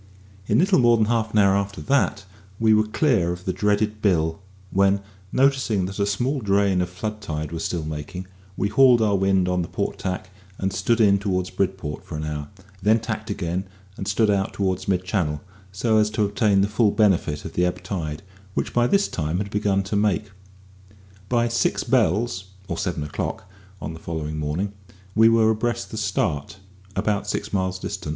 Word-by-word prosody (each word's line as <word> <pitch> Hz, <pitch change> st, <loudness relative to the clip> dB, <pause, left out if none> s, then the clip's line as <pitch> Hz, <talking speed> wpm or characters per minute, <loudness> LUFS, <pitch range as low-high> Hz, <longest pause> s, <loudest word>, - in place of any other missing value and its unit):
In -, -, +3 dB
little 185 Hz, +1 st, +4 dB
more 120 Hz, -1 st, +5 dB
than 110 Hz, -, +3 dB
half 110 Hz, -1 st, 0 dB
an 110 Hz, -, 0 dB
hour 100 Hz, -1 st, +5 dB
after 100 Hz, 0 st, -2 dB
that 110 Hz, -7 st, +1 dB, 0.3 s
we 110 Hz, -1 st, +4 dB
were 110 Hz, 0 st, +3 dB
clear 110 Hz, -, +2 dB
of 90 Hz, +1 st, -6 dB
the 95 Hz, -, 0 dB
dreaded 105 Hz, +2 st, 0 dB
Bill, 80 Hz, -4 st, +1 dB, 0.3 s
when, 100 Hz, +1 st, +3 dB, 0.3 s
noticing 130 Hz, -8 st, +2 dB
that 95 Hz, +2 st, -6 dB
a 100 Hz, -, +2 dB
small 125 Hz, +7 st, 0 dB
drain 100 Hz, -2 st, +2 dB
of 90 Hz, -, -2 dB
flood 105 Hz, +4 st, -5 dB
tide 75 Hz, -5 st, -4 dB
was 80 Hz, -1 st, -4 dB
still 85 Hz, -3 st, -2 dB
making, 80 Hz, +5 st, -5 dB, 0.3 s
we 100 Hz, -, +1 dB
hauled 130 Hz, 0 st, +6 dB
our 105 Hz, -2 st, +2 dB
wind 95 Hz, -1 st, +2 dB
on 90 Hz, 0 st, +1 dB
the 85 Hz, -, -3 dB
port -, -, -3 dB
tack, 95 Hz, 0 st, -4 dB, 0.3 s
and 95 Hz, 0 st, -2 dB
stood 115 Hz, +3 st, +1 dB
in 100 Hz, -3 st, +5 dB
towards 95 Hz, -2 st, -1 dB
Bridport 95 Hz, -6 st, -2 dB
for -, -, -7 dB
an 75 Hz, -, -4 dB
hour; 75 Hz, -1 st, -4 dB, 0.3 s
then 110 Hz, +4 st, +4 dB
tacked 110 Hz, -1 st, -5 dB
again, 95 Hz, -2 st, -2 dB, 0.3 s
and 95 Hz, -, -6 dB
stood 105 Hz, +1 st, +2 dB
out 100 Hz, -1 st, 0 dB
towards 95 Hz, -2 st, -1 dB
mid 90 Hz, -2 st, +1 dB
Channel, 90 Hz, -6 st, -1 dB, 0.3 s
so 110 Hz, +3 st, +2 dB
as 105 Hz, 0 st, +3 dB
to 105 Hz, -1 st, +1 dB
obtain 100 Hz, -1 st, +2 dB
the 100 Hz, -, +3 dB
full 105 Hz, +1 st, +2 dB
benefit 95 Hz, -9 st, +1 dB
of -, -, -6 dB
the 90 Hz, -, +1 dB
ebb 90 Hz, 0 st, -1 dB
tide, 80 Hz, -4 st, -4 dB, 0.3 s
which -, -, -2 dB
by 120 Hz, 0 st, +3 dB
this 200 Hz, +8 st, +3 dB
time 80 Hz, +1 st, -2 dB
had 100 Hz, +1 st, -3 dB
begun 100 Hz, -2 st, +1 dB
to 100 Hz, +2 st, -3 dB
make. 105 Hz, 0 st, +1 dB, 1.0 s
By 120 Hz, -1 st, +2 dB
"six 115 Hz, -, +1 dB
bells," 95 Hz, +1 st, +1 dB, 0.2 s
or -, -, -3 dB
seven 90 Hz, -6 st, -2 dB
o'clock, 75 Hz, +5 st, -4 dB, 0.3 s
on 80 Hz, -, -5 dB
the 80 Hz, -, -9 dB
following 80 Hz, -2 st, -4 dB
morning 80 Hz, +7 st, -2 dB, 0.4 s
we 110 Hz, +2 st, +6 dB
were 115 Hz, -1 st, +4 dB
abreast 120 Hz, +2 st, -2 dB
the 110 Hz, -, -5 dB
Start, 85 Hz, -7 st, -1 dB, 0.4 s
about 105 Hz, -2 st, 0 dB
six 105 Hz, +1 st, -3 dB
miles 95 Hz, -1 st, 0 dB
distant. 95 Hz, -3 st, -5 dB
100 Hz, 195 wpm, -23 LUFS, 90-110 Hz, 1.0 s, hauled